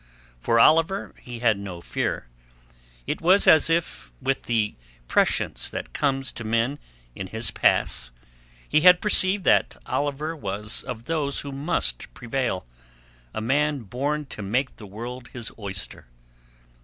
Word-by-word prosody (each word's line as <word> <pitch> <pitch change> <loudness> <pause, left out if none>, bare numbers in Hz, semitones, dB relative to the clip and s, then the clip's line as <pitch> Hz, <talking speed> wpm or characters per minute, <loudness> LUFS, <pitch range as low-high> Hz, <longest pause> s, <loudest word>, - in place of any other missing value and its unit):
For 115 - +2
Oliver 165 +9 +4
he 120 -2 -8
had 110 -3 +4
no 95 -3 -7
fear. 85 - -2 0.8
It - - -3
was 185 +4 +5
as 160 +1 +6
if 165 - -1
with 135 0 -1
the 110 -3 +1 0.3
prescience - - +1
that - - -6
comes 135 -2 0
to 120 - -8
men 115 +6 0 0.3
in 95 - -6
his 110 0 -1
pass - - +1 0.6
he 155 - +3
had 180 +1 +8
perceived 200 -2 +4
that - - +3
Oliver 145 +3 -2
was 105 -4 -4
of 120 -3 -7
those 150 -4 0
who 140 - -7
must 135 - -2
prevail, 120 - -2 0.7
a 110 - -4
man 145 +4 +1
born 140 +7 -2
to 130 - -8
make 125 +7 -1
the 105 - -10
world 120 +5 -7
his 120 -3 -5
oyster. 95 - -5
125 Hz, 145 wpm, -25 LUFS, 110-150 Hz, 0.8 s, had